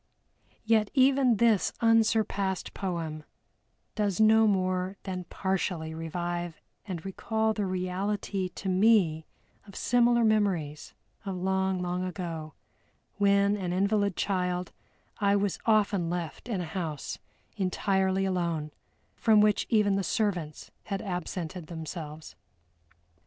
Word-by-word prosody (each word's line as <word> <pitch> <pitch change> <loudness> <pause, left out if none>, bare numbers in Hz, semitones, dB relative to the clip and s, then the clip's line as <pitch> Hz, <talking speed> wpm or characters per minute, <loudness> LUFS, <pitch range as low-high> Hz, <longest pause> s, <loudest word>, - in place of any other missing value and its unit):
Yet 220 -2 +3
even 260 -3 +4
this 225 -3 +3
unsurpassed 220 -5 +2
poem 165 -5 -4 0.7
does 205 -3 -1
no 220 0 +6
more 185 -1 0
than 185 -2 -4
partially 180 -5 -2
revive 175 +1 -4 0.3
and 180 -3 -5
recall 220 +3 -1
the 210 -2 -2
reality 185 +1 -2
to 190 - -8
me 185 -5 +3 0.4
of 200 - -13
similar 240 -1 +3
memories 195 -9 0 0.3
of 195 -2 -4
long, 190 0 0
long 180 +1 -2
ago, 170 -4 -5 0.6
when 200 0 +3
an 180 -3 -3
invalid 200 0 +1
child 180 -2 -1 0.5
I 200 -1 +3
was 200 -1 0
often 205 -5 +3
left 175 +6 -5
in 200 -6 -1
a - - -3
house 160 -3 -4 0.4
entirely 190 0 +1
alone, 170 -5 -1 0.4
from 220 -2 +4
which 210 -1 +3
even 205 -3 +3
the 195 - 0
servants 180 -6 -2
had 195 -2 -3
absented 180 -2 -4
themselves. 160 - -7
190 Hz, 115 wpm, -28 LUFS, 175-210 Hz, 0.7 s, no